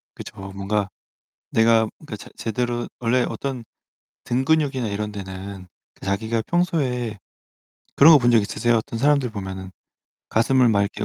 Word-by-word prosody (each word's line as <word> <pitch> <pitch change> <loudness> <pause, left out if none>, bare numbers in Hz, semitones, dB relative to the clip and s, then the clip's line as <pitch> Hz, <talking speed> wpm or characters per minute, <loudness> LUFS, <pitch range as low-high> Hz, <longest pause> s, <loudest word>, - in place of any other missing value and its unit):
그쵸. - - -9 0.2
뭔가 100 +1 -1 0.6
내가 115 0 +4 0.2
그 110 - -6
제 - - -12
제대로 120 +1 -2
원래 125 +1 +2
어떤 130 -4 -4 0.6
등 125 +2 -1
근육이나 140 -6 +1
이런 105 +1 -3
데는 95 -1 -8 0.3
자기가 110 +4 -1
평소에 135 - 0 0.8
그런 160 +4 +9
거 - - +8
본 120 -1 +3
적 115 - +6
있으세요? 115 +3 +1
어떤 115 +1 -3
사람들 140 -2 +2
보면은 95 -2 -6 0.6
가슴을 125 +2 +3
막 100 -2 +3
이렇게 100 - -3
115 Hz, 295 characters per minute, -23 LUFS, 100-130 Hz, 0.8 s, 그런